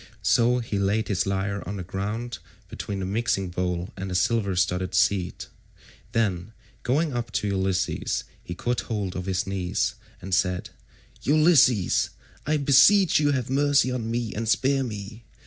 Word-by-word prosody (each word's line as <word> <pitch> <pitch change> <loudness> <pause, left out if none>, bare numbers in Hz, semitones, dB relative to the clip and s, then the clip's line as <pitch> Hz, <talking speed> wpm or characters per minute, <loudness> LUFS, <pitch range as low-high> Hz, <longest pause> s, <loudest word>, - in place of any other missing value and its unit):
So 120 +1 +3
he 115 -4 -2
laid 100 +3 0
his 95 -2 0
lyre 100 +1 -1
on 100 +2 -4
the 95 - -5
ground 105 +4 -4 0.3
between 100 -1 -5
the - - -2
mixing 95 -2 -1
bowl 90 0 -2
175 - - -7
and 95 - -4
the 90 - -3
silver 100 +1 +1
studded 90 +1 0
seat; 95 -3 +1 0.7
then 100 -3 -1 0.3
going 145 +4 0
up 120 -2 -3
to 105 - -1
Ulysses 95 -1 -1 0.2
he 90 - -6
caught 120 +6 -1
hold 105 -5 -4
of 90 +1 -5
his 95 -1 0
knees 95 -2 -1 0.3
and 95 0 -6
said, 90 -1 0 0.5
"Ulysses, 145 - +4 0.4
I 155 +1 +2
beseech 150 +7 +5
you 145 -1 +2
have 130 -2 -2
mercy 140 -1 +3
on 115 -3 -3
me 115 -1 -2
and 110 +1 -3
spare 135 +3 +2
me. 110 -1 -7
105 Hz, 165 wpm, -25 LUFS, 95-125 Hz, 0.7 s, beseech